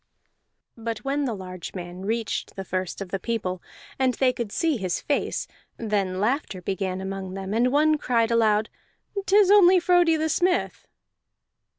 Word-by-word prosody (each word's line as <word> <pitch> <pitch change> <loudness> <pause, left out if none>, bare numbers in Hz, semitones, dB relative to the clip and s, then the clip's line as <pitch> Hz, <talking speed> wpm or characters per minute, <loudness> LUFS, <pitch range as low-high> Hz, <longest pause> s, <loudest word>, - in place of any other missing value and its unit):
But 230 +1 -5
when 280 +1 0
the 235 -4 -2
large 185 -2 -8
man 180 +1 -7
reached 225 +1 -2
the 195 - -5
first 185 +1 -3
of 195 - -5
the 195 - -2
people, 185 -5 -3 0.4
and 260 -2 +2
they 255 -2 +2
could 235 -5 -4
see 320 +1 +1
his 185 -4 -2
face, 290 - -1 0.3
then 200 -4 -1
laughter 215 -2 -1
began 190 0 -3
among 190 -1 -5
them, 195 +1 -4
and 240 +3 +2
one 305 +2 +3
cried 235 -3 +1
aloud, 220 -2 +2 0.6
"'Tis 400 +1 +5
only 375 -3 +7
Frodi 350 -2 +4
the 315 +1 0
Smith!" 355 +3 0
225 Hz, 160 wpm, -25 LUFS, 190-285 Hz, 0.6 s, only